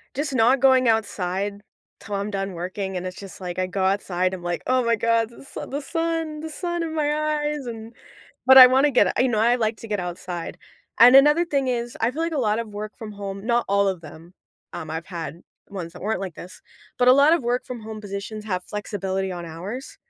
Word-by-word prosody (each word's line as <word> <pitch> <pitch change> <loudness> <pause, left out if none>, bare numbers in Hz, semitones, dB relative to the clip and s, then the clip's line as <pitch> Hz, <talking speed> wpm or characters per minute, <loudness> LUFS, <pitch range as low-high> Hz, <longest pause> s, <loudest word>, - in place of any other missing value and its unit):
Just 285 -1 -2
not 245 +3 +4
going 260 -2 +5
outside 200 -2 -1 0.4
till 205 - -7
I'm 200 +1 -2
done 195 -1 -3
working, 185 +2 -4
and 180 +1 -4
it's 185 - -6
just, 195 -1 -10
like, 180 -1 -6
I 185 - +1
go 190 +1 -3
outside. 190 -1 0
I'm 180 - -8
like, 175 0 -3
"Oh 255 -1 +2
my 235 - +3
god, 230 +1 +1
the 235 - -14
su - - -7
the 280 - -4
sun 325 0 -2
the 320 - -6
sun 345 +1 -3
in 320 -1 -4
my 295 -1 +1
eyes, 300 -1 -1
and" 225 -1 -8 0.5
but 265 0 +9
I 255 - +13
wanna 265 +3 +4
get 250 - +3
you 260 - +2
know, 220 - 0
I 235 +3 +4
like 225 -2 0
to 225 - -10
get 210 -2 -1
outside, 175 -1 -6 0.4
and 245 +3 +9
another 295 +5 +6
thing 275 -4 0
is 240 -1 -2
I 230 - +2
feel 290 +6 -6
like 335 0 -1
a - - -1
lot 215 -4 +1
of 230 -1 -4
work 210 +1 -5
from 220 -3 -8
home 200 +1 -7
not 240 0 +2
all 200 0 +3
of 185 -3 -3
them, 165 +4 -13 0.4
um, 155 -1 -6
I've 160 0 -5
had 170 -2 -7 0.3
ones 180 -4 -6
that 180 - -11
weren't 210 -2 -1
like 185 -4 -5
this, 180 - -11 0.4
but 250 0 +4
a 255 - +9
lot 280 +3 +6
of 335 - +2
work 245 +1 -1
from 250 -2 -7
home 220 0 -8
positions 205 +2 -6
have 185 -4 -3
flexibility 195 -2 -3
on 175 -1 -6
hours. 195 - -7
220 Hz, 235 wpm, -23 LUFS, 190-260 Hz, 0.5 s, I